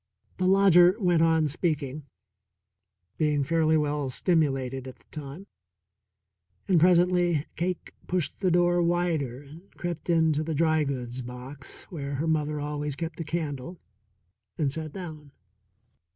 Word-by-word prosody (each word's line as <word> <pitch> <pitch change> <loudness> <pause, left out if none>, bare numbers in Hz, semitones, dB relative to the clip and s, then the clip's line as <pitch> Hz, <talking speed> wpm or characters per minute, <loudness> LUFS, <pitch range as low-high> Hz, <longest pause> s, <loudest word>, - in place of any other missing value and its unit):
The 185 - +1
lodger 185 -1 +6
went 175 -5 +3
on 160 -1 +3
speaking, 145 -2 -2 1.1
being 150 -2 +2
fairly 160 +1 +2
well 145 -2 -1
stimulated 135 -4 0
at 130 - -9
the - - -29
time, 150 +5 -8 1.2
and 180 -4 +4
presently 175 -2 +3
Cake 180 +2 -3
pushed 180 -4 -2
the 190 - +2
door 175 0 +3
wider 165 -7 0
and 160 +7 -14
crept 175 -1 -5
in 160 -2 +4
to 150 +1 -1
the 160 0 -3
dry 155 0 +2
goods 125 -2 -4
box, 125 +2 -9
where 140 -4 -4
her 145 +4 -1
mother 150 -2 0
always 145 -1 -3
kept 165 +1 -5
a - - -2
candle, 160 0 -4 0.8
and 140 -3 0
sat 155 -1 -5
down. 155 -6 -9
155 Hz, 135 wpm, -27 LUFS, 145-175 Hz, 1.2 s, lodger